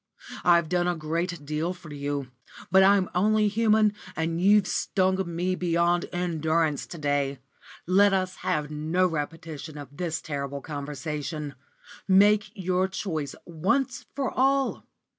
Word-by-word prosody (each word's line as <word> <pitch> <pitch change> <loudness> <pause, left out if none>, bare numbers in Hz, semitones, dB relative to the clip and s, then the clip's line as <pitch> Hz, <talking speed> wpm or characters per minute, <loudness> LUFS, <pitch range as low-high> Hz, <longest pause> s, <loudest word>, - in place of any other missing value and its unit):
I've 170 -2 +4
done 175 +1 +1
a 175 - +1
great 165 0 -3
deal 155 +5 -2
for 160 -4 -11
you, 140 -2 -3 0.4
but 190 +1 +7
I'm 195 -1 +5
only 210 +3 +3
human, 215 0 +3 0.2
and 165 +1 -1
you've 205 +1 +5
stung 190 0 +1
me 180 +2 0
beyond 175 -1 +1
endurance 160 -3 0
to 170 - -8
day. 145 -2 0 0.5
Let 200 +3 +5
us 185 -1 -1
have 150 0 -2
no 160 +5 +1
repetition 160 -1 -4
of 145 -1 -10
this 165 0 -2
terrible 140 -2 -4
conversation. 150 +1 -5 0.5
Make 205 +2 +5
your 185 -1 0
choice 165 -7 -4
once 220 - -1
for 275 -2 -1
all. 270 +1 +1
170 Hz, 135 wpm, -26 LUFS, 150-190 Hz, 0.5 s, but